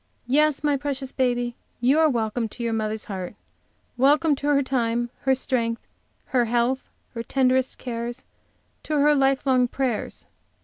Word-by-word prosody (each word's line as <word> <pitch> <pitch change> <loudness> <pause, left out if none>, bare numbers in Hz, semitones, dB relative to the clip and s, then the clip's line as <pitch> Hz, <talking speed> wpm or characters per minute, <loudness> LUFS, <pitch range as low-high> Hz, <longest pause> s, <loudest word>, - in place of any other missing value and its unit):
Yes, 295 +3 +2
my 290 -1 +2
precious 270 -1 -4
baby, 245 -2 0 0.2
you 260 +6 +3
are 320 -1 +5
welcome 225 -2 -1
to 240 - -7
your 230 -1 -1
mother's 215 -1 -2
heart, 190 -1 -6 0.6
welcome 295 +4 +4
to 285 - -4
her 285 -1 +3
time, 240 -2 -1
her 265 -1 +4
strength, 235 -3 -1 0.4
her 245 -2 +1
health, 240 +3 0 0.2
her 230 - -4
tenderest 260 +1 +1
cares, 240 0 -5 0.6
to 305 - -2
her 295 +1 +5
life 270 -1 +2
long 255 -2 +3
prayers! 250 -3 -3
255 Hz, 150 wpm, -24 LUFS, 235-275 Hz, 0.6 s, are